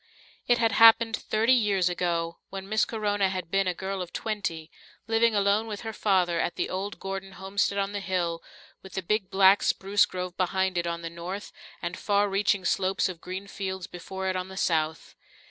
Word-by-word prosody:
It 240 - +4
had 230 -1 +2
happened 225 +1 +6
thirty 225 +3 +2
years 205 -7 +2
ago, 170 -1 -1
when 195 0 -7
Miss 215 +2 +2
Corona 205 -3 0
had 185 -3 -5
been 195 -1 +2
a 180 - +1
girl 190 +1 -4
of 180 - -6
twenty, 170 -8 -4 0.3
living 225 0 +2
alone 205 +2 +2
with 210 -2 -5
her 225 -1 -5
father 180 -5 +1
at 170 - -1
the - - -2
old 195 +2 -4
Gordon 195 0 -5
homestead 195 +2 -1
on 195 0 0
the 205 - -3
hill, 175 -3 -2 0.4
with 190 - -13
the 190 - -3
big 210 +1 0
black 190 +1 +5
spruce 200 +2 +2
grove 180 -1 -5
behind 190 0 0
it 170 0 0
on 170 0 -3
the 165 - -5
north 180 +4 -6 0.3
and 170 +1 -3
far 205 +1 +1
reaching 195 -1 +1
slopes 190 0 +1
of 170 -3 -8
green 185 +2 -6
fields 190 -2 -5
before 190 +2 -6
it 185 - 0
on 185 0 -3
the 190 0 -10
south. 160 -3 -1
190 Hz, 195 wpm, -27 LUFS, 180-205 Hz, 0.4 s, happened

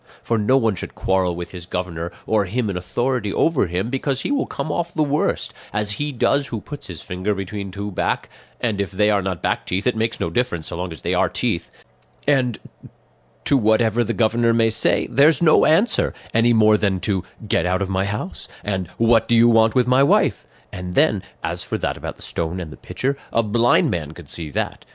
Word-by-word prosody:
For 115 -1 0
no 130 +6 +3
one 115 -5 +2
should 90 - -7
quarrel 95 -2 +1
with 85 0 -6
his 90 -2 -9
governor, 85 -2 -4
or 110 -2 +2
him 110 +2 -1
in - - -5
authority 105 +5 -1
over 150 - +2
him, 90 +7 -2
because 135 0 -1
he - - -2
will 285 - 0
come 155 - -4
off 170 +2 -2
the 155 - +1
worst, 145 0 0 0.2
as 105 0 -1
he 145 0 -1
does 140 +2 +1
who 115 - -4
puts 145 +7 -9
his 85 -4 -8
finger 95 +3 -2
between 100 +1 -5
two 100 +2 -5
back - - -1 0.3
and 110 -4 -1
if 100 - -2
they 105 +2 +2
are 100 -1 +2
not 95 -3 -4
back - - -1
teeth 95 +3 -1
it 125 - +2
makes 110 0 -1
no 85 - -2
difference, 85 -8 -1
so - - -5
long 90 +1 -4
as 80 - -9
they - - -1
are - - +2
teeth; - - -1 0.6
and 130 -5 +2 0.9
to 140 - +3
whatever 110 -1 +3
the 115 - -2
governor 115 0 +2
may 115 -1 +3
say 110 - +2
there's 145 +6 +5
no 165 -3 +5
answer, 195 +9 +3 0.2
any 115 +1 +4
more 110 -2 +5
than 100 -3 0
to 95 -3 0 0.2
'get 90 -4 +1
out 95 +2 +1
of - - -3
my 95 0 0
house' 100 -7 -5 0.2
and 95 -3 -2
'what 115 -1 +3
do 120 - +3
you 115 +1 +6
want 115 0 +4
with 125 -2 +4
my 125 +2 +4
wife?' 140 - +2 0.3
and 90 -1 -6
then, - - +3 0.2
as - - -2
for - - -3
that - - -2
about - - -6
the - - -12
stone 85 +2 -3
and 85 -4 -6
the - - -9
pitcher, 135 +2 -3 0.2
a 115 - +2
blind 115 +3 +3
man 80 -3 -3
could 80 -3 -13
see 80 -3 -5
that. - - -3
105 Hz, 220 wpm, -21 LUFS, 95-120 Hz, 0.9 s, you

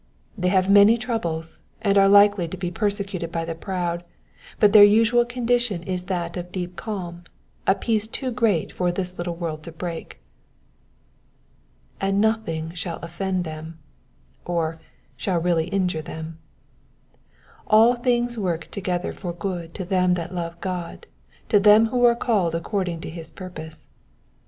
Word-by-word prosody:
They 180 -4 -1
have 185 0 +3
many 205 +3 +7
troubles, 170 -10 -3 0.2
and 200 -3 +1
are 195 0 +6
likely 200 -3 +6
to 190 - -7
be 175 0 -3
persecuted 200 -3 -2
by 165 -1 -2
the 165 - -3
proud, 175 0 -3 0.6
but 210 -1 +5
their 210 -2 +10
usual 225 +3 +5
condition 240 -6 0
is 180 0 -3
that 175 -2 -3
of 180 0 -6
deep 180 -1 -5
calm— 175 -3 -6 0.4
a 195 - +5
peace 220 -1 0
too 255 +3 -4
great 225 -9 +1
for 180 -1 0
this 180 0 -4
little 175 -1 -3
world 165 -3 -4
to 165 - -8
break. 165 - -7 1.8
''''And 195 0 +1
nothing 200 -7 0
shall 170 -1 -4
offend 180 +2 -2
them,'''' 160 0 -7 0.7
or, 165 -2 -2 0.2
'* - - -37
shall 185 -3 0
really 165 -1 +1
injure 180 -5 -1
them.'* 160 +1 -8 0.7
*' 215 - -6
All 230 +3 +7
things 240 -1 0
work 170 -5 -2
together 180 -3 -2
for 175 -3 -5
good 175 -2 -5
to 185 - -4
them 180 -1 +2
that 170 0 -5
love 170 -1 -4
God, 180 - -5 0.4
to 205 - +5
them 210 +2 +7
who 245 -1 +2
are 235 -1 +5
the - - -14
called 190 -8 +2
according 175 -1 -2
to - - -6
his 165 -1 -8
purpose.' 160 -4 -10
180 Hz, 160 wpm, -23 LUFS, 170-205 Hz, 1.8 s, their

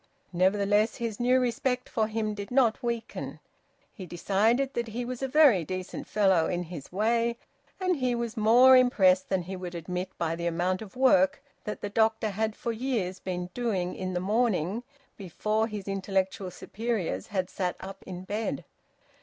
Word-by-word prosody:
Nevertheless 200 +4 +2
his 230 -3 -4
new 250 +1 +4
respect 250 +1 -1
for 220 -2 0
him 215 -1 -2
did 200 -1 -6
not 250 -2 +3
weaken; 235 -2 -4 0.5
he 185 -5 -9
decided 220 - +1
that 235 -2 -2
he 235 +2 -4
was 250 +1 -5
a 270 - 0
very 265 - +5
decent 185 +3 -5
fellow 190 -6 +3
in 175 0 -1
his 165 -5 -9
way, 230 +4 +1 0.4
and 370 -1 +1
he 250 -2 0
was 235 -1 -3
more 240 +4 +7
impressed 190 -7 +4
than 190 -2 0
he 190 +2 -6
would 180 -1 -6
admit 180 +2 -4
by 165 -1 -1
the 170 +1 -3
amount 175 +3 0
of 210 -3 -10
work 275 +2 +4 0.2
that 210 - -5
the 205 - -3
doctor 220 0 +1
had 215 +2 -1
for 235 - -3
years 225 -6 -2
been 180 -1 -4
doing 195 -7 -1
in 185 0 -4
the 180 - 0
morning 205 -1 0 0.4
before 215 +4 -1
his 210 -3 -6
intellectual 195 -1 -1
superiors 195 - -3
had 185 -3 -1
sat 180 -2 -2
up 195 0 -9
in 180 -1 -6
bed. 210 +3 -3
210 Hz, 170 wpm, -28 LUFS, 185-235 Hz, 0.5 s, more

